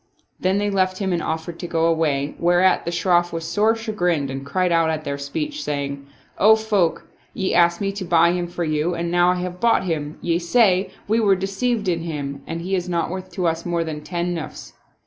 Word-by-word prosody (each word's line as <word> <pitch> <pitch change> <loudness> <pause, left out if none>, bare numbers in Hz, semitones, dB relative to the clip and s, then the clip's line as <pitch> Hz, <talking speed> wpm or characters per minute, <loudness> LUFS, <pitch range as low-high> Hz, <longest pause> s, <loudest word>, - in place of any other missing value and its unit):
Then 185 +1 +1
they 205 0 0
left 185 -1 +1
him 190 -2 -1
and 170 - 0
offered 160 +2 -4
to 175 - -5
go 165 -1 +1
away, 150 -4 +1
whereat 175 +2 +3
the 170 - -2
Shroff 175 0 +2
was 165 -1 -4
sore 210 +6 +2
chagrined 180 - -1
and 135 +1 -5
cried 180 +6 0
out 165 -1 +3
at 155 -1 -2
their 140 -1 -4
speech, 300 - -4
saying, 140 -1 -4 0.2
" - - -34
O 220 - +9
folk, 210 -6 0 0.3
ye 190 - -1
asked 170 0 +4
me 195 0 0
to 195 0 -5
buy 170 -1 +4
him 175 -1 -2
for 175 0 -4
you 155 +2 0
and 170 0 -2
now 175 0 +4
I 180 - +2
have 180 0 -4
bought 230 -1 +3
him, 155 -4 -3
ye 170 0 0
say, 190 0 +3 0.2
we 220 +2 +2
were 200 -3 +4
deceived 195 +3 -1
in 170 -2 0
him, 140 -4 -5
and 165 +1 -4
he 185 +3 -4
is 180 -1 -1
not 170 -1 -1
worth 185 0 -6
to 180 0 -2
us 165 0 0
more 170 -1 -1
than 155 -2 -5
ten 175 +3 -2
nusfs." 160 -3 -7
175 Hz, 225 wpm, -22 LUFS, 160-190 Hz, 0.3 s, O